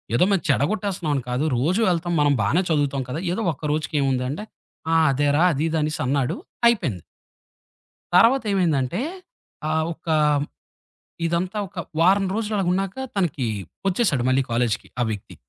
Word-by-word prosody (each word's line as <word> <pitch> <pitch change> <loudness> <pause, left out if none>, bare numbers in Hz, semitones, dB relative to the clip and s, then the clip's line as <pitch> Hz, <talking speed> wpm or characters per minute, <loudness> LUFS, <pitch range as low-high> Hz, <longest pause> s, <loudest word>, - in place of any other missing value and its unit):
ఏదో 180 - +4
మేం 195 - +3
చెడగొట్టేస్తున్నాంని 155 - 0
కాదు. 125 +5 0
రోజు 170 - +1
వెళ్తాం 175 0 -1
మనం 145 -1 +4
బానే 160 - +2
చదువుతాం 145 -3 +1
కదా! 145 - -3
ఏదో 185 - -2
ఒక్క 150 - -12
రోజుకి 155 +1 -3
ఏముంద 135 -2 +1
అంటే, 155 +9 -5 0.5
"ఆ! - - +3 0.2
అదేరా." 145 +3 +2
అది 145 +3 -1
ఇది 160 - -1
అనేసన్నాడు. 140 -3 0 0.3
అయిపోయింది. 155 - 0 1.1
తర్వాతేమైందంటే, 190 - +3 0.7
ఆహ్, 160 0 +1
ఒక 165 +1 -27 1.2
ఇదంతా 175 +5 -1
ఒక 190 - -20 0.2
వారం 195 +3 +4
రోజులలాగున్నాక 195 -3 -1 0.2
తనకి 165 -10 0 0.4
వచ్చేసాడు 180 - +1
మళ్ళీ 130 +1 +3
కాలేజికి 115 -1 0
ఆ - - +3
వీక్‌కి. 105 -3 -6
160 Hz, 130 wpm, -23 LUFS, 135-190 Hz, 1.2 s, ఏదో